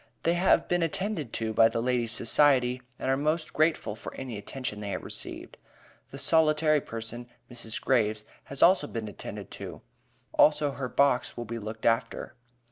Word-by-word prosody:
They 170 - +3
have 175 +2 +3
been 175 0 +1
attended 165 - -2
to 110 -1 -2
by 115 +1 +6
the 115 - -2
Ladies' 120 -1 0
Society, 125 +1 +2 0.2
and 130 - -1
are - - +3
most 155 +3 -1
grateful 155 -8 +1
for - - -8
any 130 -4 -6
attention 105 +1 -4
they 105 -1 -5
have - - -4
received. - - -6 0.5
The 135 - -9
solitary 155 +1 +3
person, 115 +1 -6 0.2
Mrs. 115 -2 -4
Graves, 110 -4 +1 0.2
has 140 - -1
also 180 -5 +5
been 115 -4 -5
attended 105 - -8
to; - - -8 0.5
also 150 -1 +4
her 135 -2 -4
box 140 -2 +2
will 120 - -4
be 115 +1 -5
looked 110 +1 -7
after. 115 0 0
125 Hz, 170 wpm, -28 LUFS, 115-150 Hz, 0.5 s, by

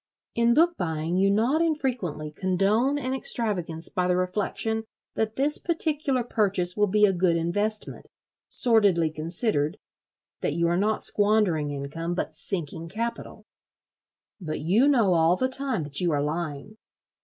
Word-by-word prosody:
In 235 0 +2
book 340 +2 +3
buying 160 0 -2
you 195 +1 +3
not 235 +10 +2
infrequently 250 - -2
condone 200 - +1
an 260 -2 -3
extravagance 190 -11 -1
by 180 -1 -1
the 180 0 +1
reflection 210 +4 -1 0.3
that 220 0 -2
this 285 +3 +2
particular 300 -6 0
purchase 195 -6 +1
will 210 0 +2
be 210 +2 +4
a 195 - +2
good 175 -1 +1
investment, 205 +6 -2 0.4
sordidly 200 -9 +3
considered: 155 0 -2 0.6
that - - -2
you 170 0 +1
are 170 - +1
not 210 +4 0
squandering 205 -8 +2
income 145 +5 -4
but 160 - -3
sinking 165 0 -5
capital. 230 +5 -5 0.9
But 160 -5 -5
you 200 - +3
know 230 -10 +3
all 165 +1 +3
the 255 - 0
time 260 - 0
that 145 +1 +1
you 175 -2 +1
are 145 -1 0
lying. 155 +5 -4
195 Hz, 145 wpm, -25 LUFS, 165-235 Hz, 0.9 s, be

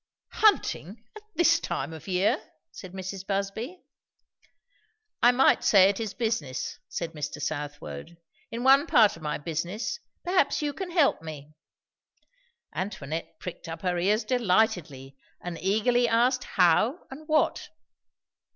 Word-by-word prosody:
"Hunting, 230 - +1
at 430 - -10
this 335 -1 +4
time 165 - -4
of 160 - -11
year!" 185 +2 +1 0.3
said 185 -2 -10
Mrs. 190 0 -6
Busby. 205 - -3 1.4
"I 240 - +7
might 260 +2 +4
say 195 -2 +6
it 200 - -2
is 220 -2 -4
business," 220 - -2
said 170 -2 -4
Mr. 150 -1 -5
Southwode. 145 - -5 0.3
"In 235 +1 -5
one 275 +4 +6
part 215 -7 +5
of 165 - -14
my 150 -1 -2
business, 170 - -3 0.2
perhaps 365 +1 +2
you 295 -2 -2
can 380 +2 -5
help 330 - +2
me." 155 -2 -9 1.2
Antoinette 165 -5 -5
pricked 180 -1 -8
up 165 +1 -7
her 180 -1 0
ears 210 +6 +2
delightedly, 180 - 0 0.2
and 175 -2 -7
eagerly 240 +5 +2
asked 245 +3 +2
how? 200 - +2
and 300 +3 -10
what? 310 -1 +1
195 Hz, 135 wpm, -27 LUFS, 165-245 Hz, 1.4 s, I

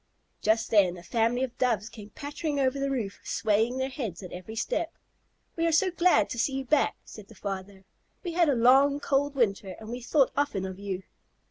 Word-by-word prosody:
Just 220 +1 +1
then 190 -5 +4
a 175 - -11
family 230 +6 +1
of 250 -2 -4
Doves 225 -5 +1
came 210 -3 -11
pattering 290 +1 -3
over 270 0 +1
the 275 0 0
roof, 230 -7 -3
swaying 220 +3 +1
their 260 0 0
heads 225 - -5
at 180 - -8
every 185 +5 -8
step. 320 +9 -1 0.6
"We 330 0 +1
are - - +2
so 365 +4 +3
glad 345 - +3
to 235 - -4
see 270 +3 +1
you 270 0 -3
back," 300 +2 +2
said 210 -2 -11
the 225 - -15
father. 195 0 -6 0.4
"We 350 - -3
had 335 -2 +3
a 280 - +3
long, 270 +4 +5
cold 285 0 0
winter, 200 -6 0
and 220 0 -10
we 245 +1 -5
thought 270 +3 +3
often 280 -10 0
of 190 0 -6
you." 195 -2 -4
240 Hz, 210 wpm, -28 LUFS, 205-280 Hz, 0.6 s, long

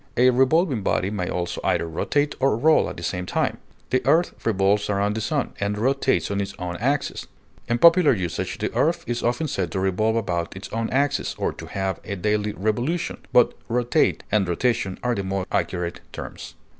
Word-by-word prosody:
A 125 +1 +6
revolving 135 - +3
body 95 0 0
may 95 -4 -2
also 90 -1 -3
either 85 - +1
rotate 145 - 0
or 135 -4 +2
roll 155 +6 +4
at - - -8
the 85 - -7
same 90 +1 -3
time; - - 0 0.3
the 130 - +2
earth 170 +3 +3
revolves 100 -1 +2
around 100 +1 +1
the 110 - -2
sun, 140 +5 -1
and 100 +1 -1
rotates 130 0 +1
on 100 0 0
its 100 - -5
own 90 -1 -4
axis; 140 +6 -1 0.4
in 120 - +2
popular 170 +3 +6
usage, 95 -8 -2
the - - -3
earth - - +1
is 120 0 -2
often 125 +7 0
said 90 - -2
to 95 - -1
revolve 95 +4 +1
about 90 -7 -2
its 95 - -8
own 115 0 -1
axis, 140 +1 0
or - - -1
to - - -10
have 95 -2 -2
a 100 - -4
daily 105 +2 0
"revolution," 120 - -1
but 125 - +5 0.2
rotate 120 +1 +1
and 100 -2 +2
"rotation" 95 0 0
are 125 0 +1
the 100 - -2
more 95 0 -2
accurate 85 -1 -2
terms. - - -8
105 Hz, 195 wpm, -24 LUFS, 95-130 Hz, 0.4 s, A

